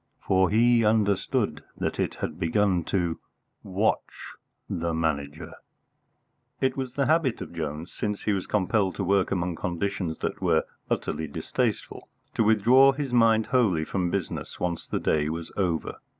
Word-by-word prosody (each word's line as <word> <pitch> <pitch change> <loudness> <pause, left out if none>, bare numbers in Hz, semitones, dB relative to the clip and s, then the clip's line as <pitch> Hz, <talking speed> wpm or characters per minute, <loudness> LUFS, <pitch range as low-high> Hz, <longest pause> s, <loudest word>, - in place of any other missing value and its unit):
For 95 -1 +3
he 115 +2 +4
understood 105 -2 +1
that - - -2
it - - -1
had 80 +1 -5
begun 95 0 +2
to 85 -4 -1 0.4
watch 100 +3 -2 0.3
the 85 -1 -2
Manager! 80 0 -2 1.1
II 130 - +3
It 130 - -5
was 130 -2 -4
the 140 - +1
habit 155 -5 +2
of - - -8
Jones, 80 0 -5
since 105 -1 -3
he 105 - +1
was 95 -2 -3
compelled 100 -1 +1
to 100 - -2
work 95 +1 +2
among 90 -2 -1
conditions 90 -2 -2
that - - -3
were - - +3 0.3
utterly 80 - -2
distasteful, 70 - -3 0.2
to - - +2
withdraw 120 +6 +6
his 135 -2 -4
mind 115 -2 +4
wholly 100 -12 +2
from 90 0 -1
business 95 -1 -4
once 85 -2 -2
the - - -2
day 75 -1 +1
was 80 +1 -5
over. 90 -5 -1
95 Hz, 155 wpm, -26 LUFS, 85-110 Hz, 1.1 s, withdraw